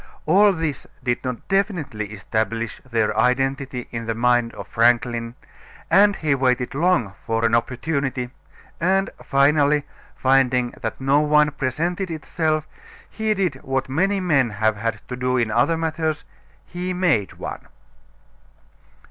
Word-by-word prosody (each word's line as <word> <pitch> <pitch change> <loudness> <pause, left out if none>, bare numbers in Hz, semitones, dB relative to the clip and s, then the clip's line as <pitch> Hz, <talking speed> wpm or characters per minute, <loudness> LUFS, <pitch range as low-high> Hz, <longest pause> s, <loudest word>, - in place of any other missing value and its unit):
All 200 +6 +5
this 160 -6 -3 0.2
did 120 -1 -1
not 125 -2 -5
definitely 180 - -1
establish 110 +2 -3
their 115 -3 +1
identity 130 +2 0
in 115 -1 -5
the 115 - -1
mind 120 0 +2
of 100 -3 -8
Franklin, 120 0 +1 0.6
and 200 +3 +6
he 155 -5 0
waited 125 -2 +1
long 150 - +1
for 115 0 0
an 115 - +1
opportunity, 130 +1 -1 0.5
and 190 +3 +1
finally, 145 +1 +3 0.3
finding 130 -2 +2
that 110 -3 -4
no 135 +2 +3
one 150 0 +4
presented 170 +7 -2
itself, 155 0 -1 0.4
he 220 0 -2
did 185 -8 0
what 135 0 -2
many 195 +8 +1
men 145 -9 +2
have 110 +1 0
had 105 0 -4
to 125 - -5
do 125 0 0
in 115 -3 +1
other 120 +9 +2
matters; 160 -2 -2 0.4
he 180 +1 -4
made 170 - +1
one. - - -7
135 Hz, 135 wpm, -22 LUFS, 120-160 Hz, 0.6 s, and